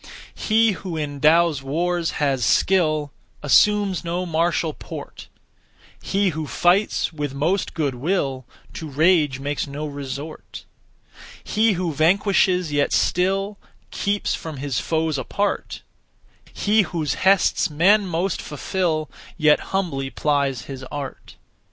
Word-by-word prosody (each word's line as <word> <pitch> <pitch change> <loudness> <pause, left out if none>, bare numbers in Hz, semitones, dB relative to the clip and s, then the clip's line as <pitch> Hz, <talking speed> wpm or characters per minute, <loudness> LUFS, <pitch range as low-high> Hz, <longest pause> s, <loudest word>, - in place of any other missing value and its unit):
He 225 0 +2
who 185 -3 -5
in 145 -2 -4
(Tao's) 160 -1 +4
wars 170 +5 -1
has 135 -4 0
skill 155 - +2 0.3
Assumes 200 - +3
no 175 +2 -2
martial 165 -1 0
port; - - -9 0.7
He 200 0 +1
who 155 -2 -4
fights 180 +2 +1
with 145 -3 -4
most 170 +7 -1
good 145 -5 0
will 135 -2 -2 0.3
To 160 - -7
rage 150 -2 +2
makes 145 +1 -3
no 145 +2 -5
resort. 145 +1 -7 0.8
He 220 0 +2
who 175 -3 -2
vanquishes 180 +1 +2
yet 145 -1 +1
still 195 +3 +1 0.3
Keeps 205 0 -1
from 160 -3 -6
his 135 -3 -2
foes 160 -3 -1
apart; 200 +8 -2 0.7
He 210 +1 +2
whose 160 -7 -2
hests 195 -2 +3
men 190 +7 +3
most 175 +3 -1
fulfil 155 +1 -2 0.3
Yet 150 -2 +4
humbly 165 -9 -2
plies 140 -4 0
his 135 -1 -8
art. 140 0 -7
160 Hz, 120 wpm, -22 LUFS, 145-185 Hz, 0.8 s, Tao's